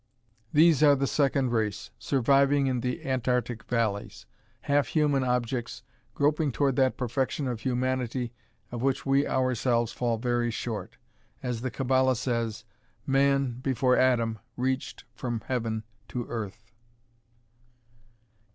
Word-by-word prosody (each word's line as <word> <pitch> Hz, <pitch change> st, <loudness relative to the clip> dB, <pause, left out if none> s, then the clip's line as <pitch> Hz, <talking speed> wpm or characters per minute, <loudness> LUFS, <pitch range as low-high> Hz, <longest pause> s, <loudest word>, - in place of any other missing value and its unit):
"These 155 Hz, -1 st, +5 dB
are 145 Hz, -2 st, +7 dB
the 140 Hz, 0 st, 0 dB
second 135 Hz, -2 st, +1 dB
race, 110 Hz, -4 st, -1 dB
surviving 140 Hz, +1 st, +3 dB
in 130 Hz, -2 st, 0 dB
the 125 Hz, +1 st, -3 dB
Antarctic 125 Hz, -3 st, -1 dB
valleys. 110 Hz, -4 st, -2 dB, 0.4 s
Half 140 Hz, -3 st, +2 dB
human 145 Hz, -4 st, +2 dB
objects, 125 Hz, -1 st, -2 dB, 0.3 s
groping 150 Hz, 0 st, +2 dB
toward 135 Hz, +1 st, +1 dB
that 130 Hz, -1 st, +2 dB
perfection 130 Hz, +3 st, -1 dB
of 120 Hz, -3 st, -3 dB
humanity 125 Hz, -1 st, -1 dB, 0.4 s
of 120 Hz, -1 st, -4 dB
which 135 Hz, +1 st, 0 dB
we 135 Hz, +1 st, +3 dB
ourselves 125 Hz, -2 st, +1 dB
fall 120 Hz, -1 st, -1 dB
very 120 Hz, 0 st, 0 dB
far -, -, -4 dB
short. 115 Hz, -3 st, -5 dB, 0.5 s
As 125 Hz, -3 st, -2 dB
the 130 Hz, -, -2 dB
Kabbala 130 Hz, +1 st, +2 dB
says, 115 Hz, -3 st, -2 dB, 0.4 s
man, 135 Hz, -2 st, +2 dB
before 130 Hz, -1 st, +2 dB
Adam, 115 Hz, -4 st, +2 dB, 0.2 s
reached 130 Hz, +1 st, -2 dB
from 120 Hz, -1 st, -4 dB
heaven 115 Hz, -4 st, -2 dB, 0.2 s
to 120 Hz, -2 st, -4 dB
earth." 110 Hz, -1 st, -6 dB
125 Hz, 125 wpm, -28 LUFS, 120-135 Hz, 0.5 s, are